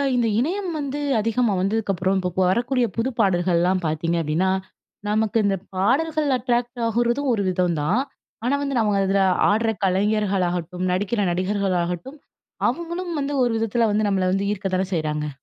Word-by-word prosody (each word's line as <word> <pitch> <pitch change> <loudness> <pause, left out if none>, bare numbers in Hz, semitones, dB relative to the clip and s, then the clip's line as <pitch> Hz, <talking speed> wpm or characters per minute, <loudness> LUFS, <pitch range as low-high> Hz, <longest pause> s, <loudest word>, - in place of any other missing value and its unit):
இந்த 235 -2 +2
இணையம் 360 +6 -1
வந்து 285 0 -3 0.2
அதிகமா 230 0 +1
வந்ததுக்கப்புறம், 195 -2 0
இப்ப 185 +2 0
வரக்கூடிய 245 +4 +1
புது 240 +3 +1
பாடல்கள்லாம் 180 -2 +2
பாத்தீங்க 165 +2 0
அப்பிடின்னா, 165 +5 +1 0.6
நமக்கு 220 +1 +1
இந்த 195 -1 +1 0.2
பாடல்கள் 295 +9 +1
அட்ராக்ட் 240 0 -1
ஆகுறதும் 240 +4 0
ஒரு 205 - 0
விதந்தான். 180 - +1 0.4
ஆனா 275 +3 +2
வந்து, 275 -3 -1
நம்ம 210 -2 +2
அதில 195 0 +2 0.3
ஆடுற 225 +2 +1 0.2
கலைஞர்களாகட்டும், 185 -3 0
நடிக்கிற 205 +3 0
நடிகர்களாகட்டும், 185 - -1 0.5
அவுங்களும் 340 +1 -4
வந்து 280 +1 -2
ஒரு 240 - +1
விதத்தில 225 0 +1
வந்து, 210 0 +1
நம்மள 185 -2 +1
வந்து 200 +1 0
ஈர்க்க 195 -1 -4
தான 190 0 -1
செய்றாங்க. 150 -1 -2
205 Hz, 140 wpm, -23 LUFS, 185-240 Hz, 0.6 s, இந்த